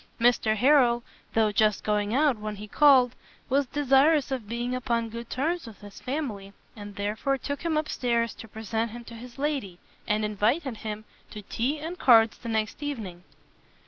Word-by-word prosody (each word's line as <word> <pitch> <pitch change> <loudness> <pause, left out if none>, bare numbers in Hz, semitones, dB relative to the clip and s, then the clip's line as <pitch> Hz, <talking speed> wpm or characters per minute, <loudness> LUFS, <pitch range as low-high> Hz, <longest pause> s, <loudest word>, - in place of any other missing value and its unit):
Mr 230 -2 +3
Harrel, 245 -1 +4 0.3
though 220 -1 +3
just 210 0 +2
going 210 -1 0
out 280 +2 +3
when 215 0 -5
he 210 +1 -9
called, 255 0 +5 0.4
was 275 +1 +2
desirous 285 +2 +3
of 240 -6 -4
being 240 +2 -2
upon 235 -2 -1
good 235 +1 -8
terms 325 +3 -2
with 220 -2 -12
his 205 -1 -11
family, 230 -9 -4 0.2
and 205 -2 -9
therefore 215 +7 -1
took 285 +2 -5
him 325 -2 0
up 305 0 -1
stairs 235 -2 0
to 225 - -11
present 220 +1 -3
him 240 +2 -9
to 235 - -12
his 240 +2 -11
lady, 275 -11 -2 0.3
and 210 0 +1
invited 225 - 0
him 215 0 -6 0.2
to 210 - -9
tea 250 +9 -1
and 325 +4 -6
cards 225 -3 +5
the 235 - -7
next 220 +3 -2
evening. 215 -12 -5
235 Hz, 175 wpm, -27 LUFS, 215-275 Hz, 0.4 s, called